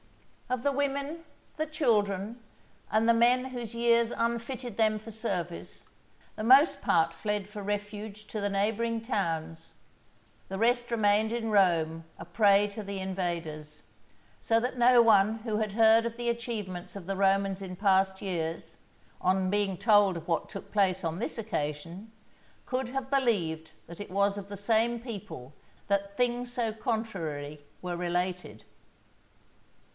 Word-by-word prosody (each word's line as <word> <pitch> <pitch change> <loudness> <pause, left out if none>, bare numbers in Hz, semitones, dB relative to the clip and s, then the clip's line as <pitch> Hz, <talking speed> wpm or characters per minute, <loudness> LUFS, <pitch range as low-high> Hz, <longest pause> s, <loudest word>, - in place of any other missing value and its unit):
Of 250 -1 -1
the 285 - +2
women, 280 +3 -2 0.3
the 310 +1 -1
children, 220 - 0 0.5
and 220 +1 +3
the 230 - +6
men 245 +2 +4
whose 240 -3 -6
years 235 0 +3
unfitted 235 0 -3
them 215 -1 +2
for 220 +1 -10
service, 190 -6 -5 0.5
the 215 - -5
most 280 +4 +6
part 165 0 +2
fled 210 +3 -2
for 210 0 -8
refuge 205 +1 -5
to 215 - -5
the 205 - 0
neighbouring 220 +3 0
towns, 165 -8 -3 0.8
the 190 - -4
rest 240 +3 +2
remained 215 -1 +3
in 230 -1 -2
Rome 165 -5 +2
a - - -9
prey 200 +2 +4
to 210 +1 -7
the 200 -1 -5
invaders; 170 -5 -4 0.6
so 225 0 +2
that 250 +2 -3
no 245 0 +6
one 215 -1 +5
who 215 -2 -1
had 215 -2 -1
heard 225 +1 +5
of 230 0 -4
the 240 0 -1
achievements 215 -7 -4
of 190 - -9
the 195 +2 -2
Romans 195 0 +2
in 185 -1 -6
past 190 0 +2
years, 165 -4 -4 0.4
on 185 0 +1
being 200 -2 0
told 205 -3 +4
of 165 - -9
what 165 -2 -1
took 195 - -9
place 190 -3 +2
on 165 +2 -2
this 235 - -3
occasion, 170 0 -4 0.5
could 255 -1 -2
have 265 0 -4
believed 180 - +1 0.2
that 170 +3 -10
it 205 - -8
was 200 +1 +2
of 200 0 -7
the 200 - -6
same 225 +3 +1
people 200 - -8 0.3
that 200 0 -1
things 245 0 0
so 235 -3 -1
contrary 165 - -4 0.2
were 180 -1 -3
related. 175 - -3
205 Hz, 150 wpm, -29 LUFS, 185-235 Hz, 0.8 s, the